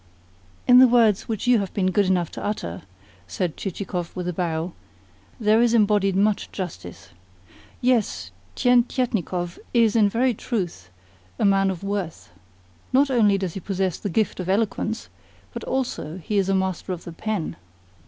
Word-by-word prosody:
"In 250 0 +8
the 260 - +9
words 230 -5 +3
which 220 -3 -3
you 245 -2 +5
have 195 -2 -3
been 185 -2 +1
good 200 +1 +2
enough 180 -3 +1
to - - -7
utter," 90 - -3 0.5
said 175 -5 -2
Chichikov 180 -2 -4
with 180 -1 -4
a 180 - -1
bow, 170 0 -2 0.7
"there 220 0 +4
is 235 -1 +3
embodied 205 -3 +3
much 205 +1 +1
justice. 165 - -7 0.7
Yes, 235 - +1 0.2
Tientietnikov 235 - +1 0.2
is 230 -2 +4
in 210 -3 +5
very 245 +4 +2
truth 180 - -4 0.5
a - - +1
man 195 -1 +4
of 190 -1 -4
worth. 195 - -4 0.6
Not 275 +2 +3
only 210 -5 +4
does 190 -4 -3
he - - -5
possess 190 -1 -2
the 205 - -3
gift 215 +2 0
of 180 0 -4
eloquence, 220 +2 -1 0.5
but - - -6
also 245 - -3
he 200 +4 -1
is 195 -1 0
a 195 - +3
master 190 0 -1
of 175 - -7
the 170 - -8
pen." 205 -1 -3
195 Hz, 165 wpm, -24 LUFS, 180-225 Hz, 0.7 s, the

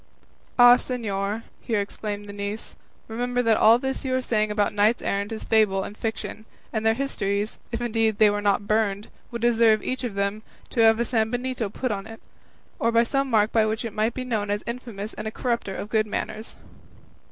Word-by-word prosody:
"Ah, 245 0 +9
señor," 215 -4 -3 0.2
here 225 -3 -1
exclaimed 205 0 -4
the 205 - -9
niece, 205 +2 -5 0.3
"remember 245 +2 -1
that 225 -2 +4
all 225 +2 +7
this 265 +2 -3
you 260 -1 0
are 260 - +1
saying 215 -3 +1
about 210 -1 0
knights 210 +3 +2
errant 200 +2 -1
is 220 - -5
fable 205 -3 +3
and 205 - -7
fiction; 220 0 -5 0.3
and 220 -1 -1
their 225 0 +3
histories, 210 -6 -2
if 235 - -2
indeed 225 -2 +1
they 215 - +6
were 205 0 -1
not 205 0 +1
burned, 210 -1 0 0.2
would 235 -1 -6
deserve, 225 -3 +4
each 255 0 -3
of 235 -5 -3
them, 200 +2 -1 0.3
to - - -3
have 225 0 +6
a 235 - +1
sambenito 245 0 -1
put 255 +2 -2
on 200 0 -4
it, 225 0 -10 0.6
or 230 0 +3
some 275 +2 0
mark 215 -2 +3
by 225 - +4
which 220 +2 -1
it 225 - -5
might 220 +2 0
be 255 - -3
known 220 -5 -2
as 205 0 -1
infamous 235 -3 -6
and 215 - -6
a - - -3
corrupter 235 -5 -2
of - - -5
good 215 0 +1
manners." 215 +1 -4
220 Hz, 200 wpm, -25 LUFS, 205-235 Hz, 0.6 s, Ah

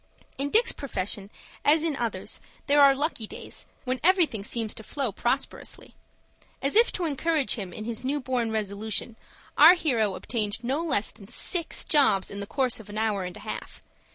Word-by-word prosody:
In 280 +1 0
Dick's 455 +9 +5
profession 200 -6 -3 0.3
as 310 +2 +4
in 320 -3 0
others 230 -7 -3 0.2
there 290 0 +4
are 275 -1 +7
lucky 275 -6 -2
days, - - -9 0.2
when 255 0 -1
everything 335 - +3
seems 220 0 -2
to - - -9
flow 265 +1 -2
prosperously. 240 +7 -3 0.7
As 275 - -1
if 460 +2 +7
to 360 - -2
encourage 310 -1 +1
him 195 -6 -4
in 215 - -7
his 235 +1 -3
new 280 +3 -1
born 250 -3 -1
resolution, 215 +2 -3 0.4
our 320 +5 +10
hero 230 - 0
obtained 215 -1 -2
no 270 +7 -1
less 260 -11 +1
than 200 -4 -15
six 330 - +1
jobs 270 -11 +3
in 200 - -6
the 200 - -6
course 255 0 0
of 215 - -13
an 205 - -7
hour 215 -4 0
and 180 - -7
a - - -12
half. - - -7
245 Hz, 180 wpm, -26 LUFS, 215-290 Hz, 0.7 s, our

